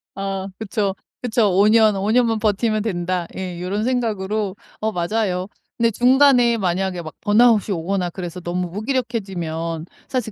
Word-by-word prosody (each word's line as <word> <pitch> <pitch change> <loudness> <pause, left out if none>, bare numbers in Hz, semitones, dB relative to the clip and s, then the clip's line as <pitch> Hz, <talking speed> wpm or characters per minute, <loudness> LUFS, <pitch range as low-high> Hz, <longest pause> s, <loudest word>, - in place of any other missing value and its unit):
아 195 -1 -3
그쵸. 205 -2 -2 0.3
그쵸. 225 -3 +2
'5 195 +3 +4
년, 215 -1 +5
5 200 +2 0
년만 230 -2 +3
버티면 215 0 +1
된다.' 180 -4 -2
예. 185 -2 -4
이런 190 +4 -2
생각으로. 215 -5 -1 0.2
어 220 0 -1
맞아요. 185 0 -1 0.3
근데 230 -1 +3
중간에 250 0 +5
만약에 185 -2 -1
막 155 -2 -8
번아웃이 215 -1 +4
오거나 180 +2 -1
그래서 175 0 -6
너무 175 +1 -2
무기력해지면 190 - -3 0.2
사실 250 -4 -2
205 Hz, 310 characters per minute, -21 LUFS, 180-225 Hz, 0.3 s, 년